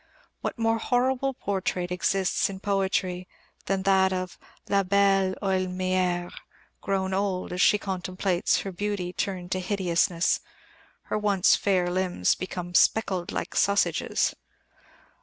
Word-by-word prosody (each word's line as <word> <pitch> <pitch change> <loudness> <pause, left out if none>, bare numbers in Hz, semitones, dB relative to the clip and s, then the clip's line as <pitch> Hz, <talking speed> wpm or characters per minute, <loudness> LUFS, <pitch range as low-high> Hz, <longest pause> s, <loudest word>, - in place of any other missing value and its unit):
What - - -4
more 225 0 +1
horrible 260 +3 0
portrait 185 -4 -2
exists 180 +3 +1
in 190 -1 -7
poetry 190 -2 -1 0.4
than 195 -1 0
that 190 -1 +4
of 185 -1 -4 0.3
"la 200 -1 +3
belle 195 0 +2
Heaulmière" 185 -2 0 0.5
grown 190 -1 -1
old, 190 -2 -1
as 180 - -1
she 210 - +5
contemplates 185 -1 -1
her 195 - -5
beauty 190 -1 -3
turned 185 -3 -3
to 185 - 0
hideousness 180 -2 +1 0.6
her - - -2
once 200 -2 +4
fair 185 -3 +1
limbs 180 - +1
become 180 -1 -6
"speckled 185 -2 +2
like - - -4
sausages"? 200 0 +1
190 Hz, 120 wpm, -26 LUFS, 180-200 Hz, 0.6 s, she